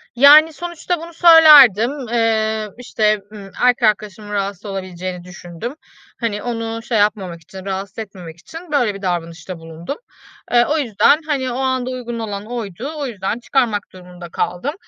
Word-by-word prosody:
Yani, 300 +5 +7
sonuçta 345 +2 -4
bunu 335 +1 -10
söylerdim. 300 - +7 0.2
Eee, 220 -2 0
işte, 215 -4 0
ımm, 200 -2 -11
erkek 245 -1 +3
arkadaşımın 210 0 -5
rahatsız 200 0 -3
olabileceğini 185 -2 -6
düşündüm. 180 - -8 0.4
Hani, 215 -3 -3
onu 230 -1 -4
şey 240 -3 -1
yapmamak 195 -5 0
için, 190 +3 -12
rahatsız 195 +2 -5
etmemek 180 -6 -9
için, 325 - -11
böyle, 245 -8 +1
bir 195 - -9
davranışta 175 -1 -4
bulundum. 165 - -8 0.5
Eee, 240 0 +5
o 315 - +1
yüzden, 240 +1 +3
hani, 265 -4 -1
o 240 - -4
anda 260 -1 -1
uygun 240 -2 -5
olan 205 -2 -5
oydu. 235 - -6
O 285 - -3
yüzden 210 0 -4
çıkarmak 240 -5 0
durumunda 180 -1 -11
kaldım. 180 - -3
220 Hz, 155 wpm, -19 LUFS, 190-255 Hz, 0.5 s, Yani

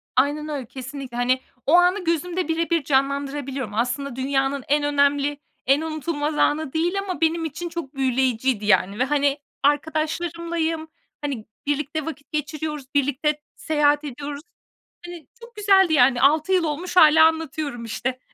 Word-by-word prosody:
Aynen 295 +4 +1
öyle. 280 -4 -4
Kesinlikle. 260 +1 -8
Hani, 255 +1 +1 0.2
o 300 - +2
anı 360 +2 +3
gözümde 340 +2 -1
birebir 330 -1 0
canlandırabiliyorum. 275 -3 -1
Aslında 245 +4 -2
dünyanın 270 +1 0
en 295 +1 +2
önemli, 285 0 +2 0.3
en 275 +3 +3
unutulmaz 310 -1 -3
anı 305 -1 +1
değil 350 +5 0
ama 370 -4 -4
benim 325 +1 +1
için 325 +3 -5
çok 330 -4 -7
büyüleyiciydi, 255 -3 0
yani, 200 +1 +2
ve, - - +4
hani, 285 +1 +1 0.3
arkadaşlarımlayım, 320 +2 -1 0.3
hani, 270 -7 -4 0.2
birlikte 290 +1 -1
vakit 295 -3 -8
geçiriyoruz, 300 -1 -3
birlikte 285 +2 0
seyahat 295 -1 +2
ediyoruz. 285 +1 -6 0.6
Hani, 345 -4 -10
çok 470 0 -13
güzeldi, 390 -4 +4
yani. 250 -3 +4
6 310 +6 +3
yıl 365 -2 +3
olmuş 330 +4 -3
hâlâ 315 -2 +8
anlatıyorum, 305 -6 -3
işte. 255 +3 -3
290 Hz, 140 wpm, -23 LUFS, 270-320 Hz, 0.6 s, hâlâ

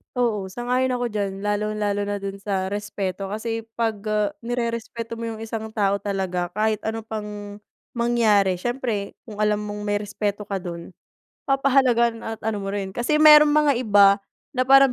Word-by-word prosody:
Oo 225 -6 0
sang-ayon 250 +5 0
ako 245 -1 -2
diyan 200 -2 -2
lalong-lalo 205 0 -1
na 205 - -1
do'n 195 0 -5
sa 195 -1 -2
respeto 200 -2 -3
kasi 225 +2 -4
'pag, 225 -2 0
ah, 210 -1 +1 0.2
nirerespeto 230 -1 -3
mo 230 - -3
yung 220 - -10
isang 220 0 -4
tao 200 -2 +1
talaga 190 -3 -2
kahit 215 0 +1
ano 220 0 -3
pang, 210 -2 -6 0.4
mangyari 215 -6 +3
siyempre 240 -5 -3
kung 215 -2 -6
alam 210 0 +3
mong 210 0 -5
may 205 0 0
respeto 205 0 -3
ka 195 -2 -3
do'n 170 0 -7 0.6
papahalagahan 255 -4 +3
at 225 0 -5
ano 215 -2 -1
mo 195 - -4
rin 195 -1 -3
kasi 240 +7 0
mayro'n 300 -1 +9
mga 300 -1 +4
iba 200 -3 +5 0.3
na 255 -1 0
parang 270 -1 +7
210 Hz, 165 wpm, -23 LUFS, 200-235 Hz, 0.6 s, mayro'n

